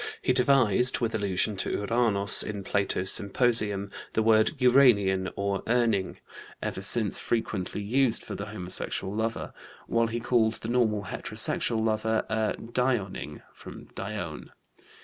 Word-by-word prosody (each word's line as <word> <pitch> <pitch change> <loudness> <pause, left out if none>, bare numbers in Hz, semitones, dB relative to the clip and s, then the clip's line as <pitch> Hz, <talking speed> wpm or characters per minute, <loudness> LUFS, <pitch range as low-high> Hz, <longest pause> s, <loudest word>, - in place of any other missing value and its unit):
He 130 - 0
devised 125 -2 +3
(with 115 -2 -2
allusion 100 -1 -1
to - - -2
Uranos 105 -2 +4
in 105 -2 -4
Plato's 95 -1 -1
Symposium) 105 -2 +2 0.2
the 110 - +1
word 110 +2 +3
uranian 110 -8 +3
or 100 -1 -2
urning, 115 -5 0 0.4
ever - - -5
since - - +2
frequently 105 -3 -3
used 120 +2 +1
for - - -8
the 105 - -6
homosexual 95 -1 -3
lover, 110 +1 -3 0.3
while 115 0 0
he 115 +1 -4
called 115 -2 +1
the 110 - -7
normal 110 -4 0
heterosexual 110 +3 -3
lover 110 0 -1
a 110 -1 -1
dioning 115 - -3
(from - - -12
Dione). 95 -6 -6
110 Hz, 130 wpm, -26 LUFS, 100-120 Hz, 0.4 s, Uranos